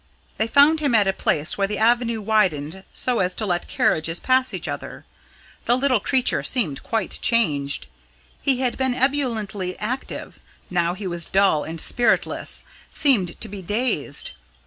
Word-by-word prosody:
They 220 Hz, -, +1 dB
found 285 Hz, +6 st, +5 dB
him 285 Hz, -6 st, +1 dB
at 205 Hz, -3 st, +4 dB
a 195 Hz, -, +2 dB
place 155 Hz, 0 st, 0 dB
where 195 Hz, -, +2 dB
the 210 Hz, 0 st, -3 dB
avenue 235 Hz, 0 st, +2 dB
widened 190 Hz, -5 st, 0 dB
so 250 Hz, -2 st, 0 dB
as 180 Hz, 0 st, 0 dB
to 220 Hz, -, -2 dB
let 175 Hz, -3 st, -1 dB
carriages 165 Hz, +2 st, 0 dB
pass 260 Hz, 0 st, +2 dB
each -, -, -5 dB
other. -, -, -6 dB, 0.6 s
The 240 Hz, -, +3 dB
little 260 Hz, -3 st, +2 dB
creature 255 Hz, +5 st, +1 dB
seemed 185 Hz, -, 0 dB
quite 225 Hz, -1 st, -2 dB
changed. 145 Hz, -12 st, +1 dB, 0.6 s
He 265 Hz, -2 st, +1 dB
had 250 Hz, -1 st, -1 dB
been 260 Hz, -2 st, +1 dB
ebulliently 225 Hz, -9 st, -1 dB
active; 250 Hz, +5 st, -5 dB, 0.3 s
now 175 Hz, -1 st, +1 dB
he 200 Hz, -, -7 dB
was 175 Hz, -2 st, 0 dB
dull 190 Hz, -6 st, +3 dB
and 165 Hz, +1 st, -6 dB
spiritless 240 Hz, +7 st, +1 dB, 0.3 s
seemed 230 Hz, -, +1 dB
to -, -, -2 dB
be 200 Hz, -1 st, -8 dB
dazed. 220 Hz, +8 st, -1 dB
215 Hz, 160 wpm, -22 LUFS, 180-250 Hz, 0.6 s, found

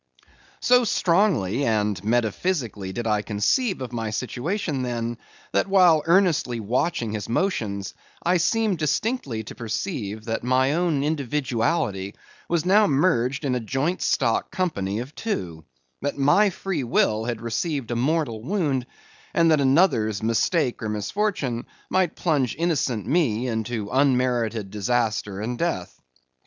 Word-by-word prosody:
So 250 Hz, 0 st, +5 dB
strongly 170 Hz, -, +2 dB
and 105 Hz, -5 st, 0 dB
metaphysically 115 Hz, -, -1 dB
did 120 Hz, +4 st, -4 dB
I 105 Hz, -2 st, +1 dB
conceive 135 Hz, -, 0 dB
of 125 Hz, -1 st, -7 dB
my 115 Hz, -2 st, -2 dB
situation 135 Hz, -, -2 dB
then, 120 Hz, -1 st, -3 dB, 0.3 s
that -, -, +1 dB
while 180 Hz, -5 st, +5 dB
earnestly 170 Hz, -9 st, +3 dB
watching 115 Hz, +2 st, -1 dB
his 105 Hz, -1 st, -4 dB
motions, 110 Hz, -, -1 dB, 0.3 s
I 180 Hz, +1 st, +3 dB
seemed 210 Hz, +1 st, +1 dB
distinctly 150 Hz, -, -1 dB
to -, -, -9 dB
perceive 110 Hz, -, -4 dB
that 115 Hz, -1 st, -2 dB
my 130 Hz, +3 st, +2 dB
own 165 Hz, -4 st, +1 dB
individuality 130 Hz, -, -1 dB, 0.3 s
was 170 Hz, -2 st, +1 dB
now 205 Hz, +3 st, +5 dB
merged 135 Hz, -3 st, +1 dB
in 130 Hz, -, +1 dB
a 125 Hz, -, 0 dB
joint 135 Hz, -, -1 dB
stock 115 Hz, -5 st, +1 dB
company 100 Hz, -, -2 dB
of 130 Hz, +4 st, -9 dB
two; 85 Hz, -, -4 dB, 0.4 s
that 145 Hz, +1 st, -2 dB
my 145 Hz, +10 st, +4 dB
free 180 Hz, -5 st, -3 dB
will 110 Hz, -2 st, +1 dB
had 120 Hz, -2 st, -3 dB
received 120 Hz, +3 st, -2 dB
a -, -, -1 dB
mortal 130 Hz, -3 st, 0 dB
wound; 140 Hz, -, -1 dB, 0.5 s
and 165 Hz, -1 st, +4 dB
that 155 Hz, -2 st, +4 dB
another's 130 Hz, -, +3 dB
mistake 120 Hz, +5 st, +1 dB
or 110 Hz, -, -3 dB
misfortune 125 Hz, -, -2 dB, 0.2 s
might 185 Hz, -3 st, +1 dB
plunge 145 Hz, -9 st, 0 dB
innocent 150 Hz, -, 0 dB
me 130 Hz, -7 st, +1 dB
into 110 Hz, -2 st, -2 dB
unmerited 125 Hz, -6 st, +1 dB
disaster 105 Hz, -2 st, -1 dB
and 120 Hz, +2 st, -3 dB
death. 170 Hz, -, -3 dB
125 Hz, 135 wpm, -24 LUFS, 110-165 Hz, 0.5 s, So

